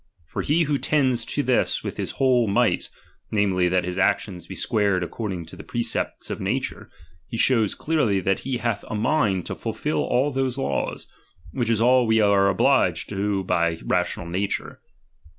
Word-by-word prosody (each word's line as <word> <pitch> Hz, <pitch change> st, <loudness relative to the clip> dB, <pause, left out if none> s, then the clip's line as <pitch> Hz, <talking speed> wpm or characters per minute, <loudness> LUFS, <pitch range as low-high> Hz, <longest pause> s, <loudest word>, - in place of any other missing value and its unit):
For -, -, -4 dB
he 165 Hz, +4 st, +2 dB
who 145 Hz, -2 st, 0 dB
tends 130 Hz, -6 st, +1 dB
to 145 Hz, -, -1 dB
this 125 Hz, -2 st, +1 dB
with -, -, -5 dB
his -, -, -3 dB
whole 125 Hz, -3 st, +3 dB
might, 100 Hz, -, +1 dB, 0.4 s
namely, 95 Hz, -4 st, +2 dB
that 90 Hz, 0 st, +1 dB
his 90 Hz, +1 st, -3 dB
actions 90 Hz, -2 st, 0 dB
be 95 Hz, -, -7 dB
squared 100 Hz, -3 st, +1 dB
according 95 Hz, -3 st, -4 dB
to -, -, -11 dB
the -, -, -10 dB
precepts 120 Hz, -1 st, -2 dB
of -, -, -4 dB
nature, -, -, -3 dB, 0.4 s
he 115 Hz, -, -5 dB
shows 115 Hz, -4 st, +3 dB
clearly 135 Hz, -11 st, +1 dB
that 95 Hz, +1 st, 0 dB
he 130 Hz, -1 st, -3 dB
hath 115 Hz, -4 st, -2 dB
a -, -, -4 dB
mind 105 Hz, -, +1 dB
to -, -, -4 dB
fulfil -, -, -3 dB
all 130 Hz, +4 st, +1 dB
those 135 Hz, -1 st, -1 dB
laws; 135 Hz, -, -2 dB, 0.5 s
which 120 Hz, -4 st, -2 dB
is 115 Hz, -2 st, +2 dB
all 125 Hz, 0 st, +4 dB
we 110 Hz, 0 st, +3 dB
are 100 Hz, -2 st, +4 dB
obliged 100 Hz, -, +2 dB
to 100 Hz, -1 st, -1 dB
by 85 Hz, -2 st, +1 dB
rational 90 Hz, -1 st, -1 dB
nature. 95 Hz, +4 st, -3 dB
105 Hz, 175 wpm, -24 LUFS, 95-125 Hz, 0.5 s, all